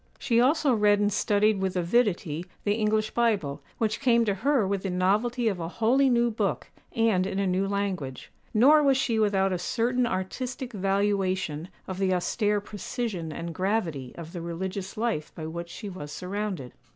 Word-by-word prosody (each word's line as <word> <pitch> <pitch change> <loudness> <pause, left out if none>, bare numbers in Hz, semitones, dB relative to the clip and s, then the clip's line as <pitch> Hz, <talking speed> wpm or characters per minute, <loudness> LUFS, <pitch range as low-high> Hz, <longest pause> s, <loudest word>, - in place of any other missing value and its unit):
She 235 -3 +2
also 285 +1 +3
read 210 -2 +4
and 205 0 +1
studied 210 +1 +2
with 190 -1 -1
avidity 175 -4 +1 0.2
the 205 - +2
English 215 0 +1
Bible, 205 -12 0 0.2
which 220 -1 0
came 235 -4 +3
to 205 - +1
her 260 +3 +2
with 195 -1 -1
the 195 - -3
novelty 215 +7 +1
of 195 -5 0
a 165 - -3
wholly 240 +8 +2
new 240 -1 +3
book, 215 - -2 0.2
and 220 -6 +2
in 195 - -3
a 200 - +1
new 190 +1 +1
language; 190 -10 -3 0.2
nor 280 +8 +6
was 275 -2 +4
she 235 -4 +1
without 195 -3 +2
a 180 - -2
certain 240 +6 0
artistic 245 +7 -4
valuation 195 -5 0 0.2
of 185 0 -5
the 190 -1 +2
austere 205 +3 +1
precision 205 -4 -4
and 165 +2 -5
gravity 175 - -1
of 170 -1 -8
the 175 - -5
religious 185 +4 -5
life 220 -9 -1
by 160 - -6
which 170 +2 -6
she 210 - -7
was 150 -7 -7
surrounded. 185 -7 -4
200 Hz, 175 wpm, -27 LUFS, 180-230 Hz, 0.2 s, nor